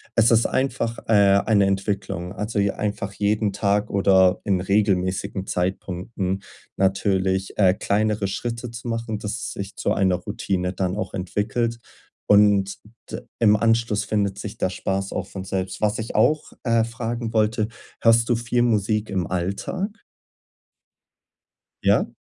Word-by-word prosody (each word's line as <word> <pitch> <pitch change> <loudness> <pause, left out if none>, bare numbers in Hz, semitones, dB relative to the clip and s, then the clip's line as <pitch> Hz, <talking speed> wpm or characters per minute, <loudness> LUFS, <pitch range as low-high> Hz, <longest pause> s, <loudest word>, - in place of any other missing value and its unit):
es 115 0 +5
ist 115 0 +4
einfach, 125 -3 -1
äh, 100 -2 +5
eine 105 -3 +4
Entwicklung. 95 -2 -2
Also, 105 +1 -2
je 100 0 +2
einfach 100 -1 -3
jeden 105 +1 0
Tag 100 +1 +1
oder 95 -1 +4
in 95 -3 +1
regelmäßigen 95 -1 0
Zeitpunkten 95 +1 -2 0.3
natürlich, 95 0 0
äh, 95 -3 +5
kleinere 105 +1 0
Schritte 115 +4 -4
zu 115 +1 -8
machen, 115 -1 -2
dass 105 0 -4
es 115 0 -4
sich 100 +1 -6
zu - - 0
einer 95 -2 +2
Routine 90 0 -2
dann 95 -1 -1
auch 105 - -4
entwickelt. 110 +6 -1 0.5
Und 100 -1 +5 0.3
d - - -5 0.2
im 105 -2 +5
Anschluss 115 -1 +1
findet 100 -2 -1
sich 100 +1 -7
der - - 0
Spaß 95 +1 -3
auch 95 - -3
von 95 -1 -7
selbst. 95 -1 -3
Was 105 0 +1
ich 110 0 -5
auch, 150 +8 +2
äh, 115 -2 +3
fragen 115 0 -4
wollte, 110 0 +1 0.3
hörst 115 0 +5
du 120 - +2
viel 120 +1 0
Musik 105 -2 +1
im 95 -4 -1
Alltag? 100 - -3 1.9
Ja? - - +3
105 Hz, 145 wpm, -23 LUFS, 95-115 Hz, 1.9 s, es